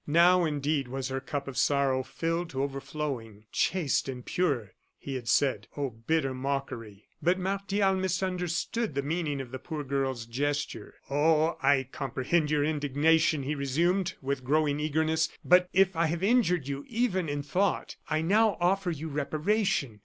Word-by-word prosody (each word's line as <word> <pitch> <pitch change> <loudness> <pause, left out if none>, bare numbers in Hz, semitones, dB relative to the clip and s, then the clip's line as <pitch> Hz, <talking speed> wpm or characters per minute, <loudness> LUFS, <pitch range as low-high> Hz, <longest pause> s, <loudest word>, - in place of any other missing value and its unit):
Now, 175 +3 +5
indeed, 145 -2 0
was 135 +1 -4
her 135 0 -2
cup 140 +1 -4
of 135 -1 -3
sorrow 140 -2 +2
filled 165 +5 -2
to 135 -3 -2
overflowing. 135 -6 -4
"Chaste 165 -7 +1
and 125 -2 -6
pure!" 135 - -1 0.2
he 140 - -6
had 125 -3 -5
said. 120 -8 +2
Oh, 140 -3 -1
bitter 135 +5 -1
mockery! 130 -6 -4 0.2
But 175 +2 +3
Martial 195 +1 0
misunderstood 185 - -1
the 140 - 0
meaning 150 -1 -1
of 130 -3 -6
the 130 - -5
poor 150 +2 -5
girl's 135 -3 -2
gesture. 145 +5 -3 0.2
"Oh! 155 +3 +3
I 135 -2 +3
comprehend 150 +3 0
your 150 -1 +2
indignation," 150 +1 +2
he 145 +3 -1
resumed, 170 +7 0
with 135 -1 -2
growing 150 +2 +1
eagerness. 160 +2 +1 0.2
"But 180 +1 +5
if 190 -1 +3
I 165 0 +2
have 170 +3 -2
injured 195 - +3
you 140 0 -4
even 220 -8 0
in 145 0 -2
thought, 185 +7 0
I 155 0 +1
now 210 +5 +3
offer 180 +1 +1
you 160 -1 -4
reparation. 150 - 0
150 Hz, 160 wpm, -29 LUFS, 135-175 Hz, 0.2 s, Now